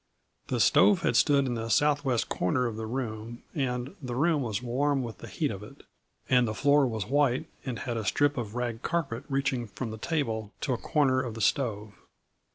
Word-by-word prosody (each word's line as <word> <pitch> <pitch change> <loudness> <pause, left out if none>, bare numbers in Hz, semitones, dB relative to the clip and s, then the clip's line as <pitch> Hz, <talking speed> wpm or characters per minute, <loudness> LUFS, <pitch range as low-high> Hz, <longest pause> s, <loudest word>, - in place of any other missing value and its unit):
The - - -1
stove 200 -4 +5
had - - +2
stood 140 -2 +4
in 125 - -1
the 115 -1 -3
southwest 140 0 +2
corner 125 +8 0
of 115 -3 -2
the 110 0 -5
room, 115 -1 -5
and 130 +1 -2
the 125 -3 -4
room 155 +2 +2
was 120 -1 -2
warm 135 +3 +1
with 115 -5 -7
the - - -9
heat - - -1
of - - -6
it; - - -12 0.4
and 125 -2 +4
the 110 - -3
floor 140 +4 +4
was 110 -5 -3
white 135 +1 +2 0.2
and 125 -2 -2
had 120 -4 -3
a 110 - -2
strip 145 +7 +2
of 115 -3 -4
rag 120 -2 -2
carpet 140 -7 -2
reaching 135 -3 0
from 110 +4 -5
the 110 - -7
table 110 -9 -2
to 135 - 0
a - - -1
corner 135 -4 +2
of 120 -4 -5
the - - -6
stove. 105 -3 0
125 Hz, 205 wpm, -28 LUFS, 115-140 Hz, 0.4 s, stove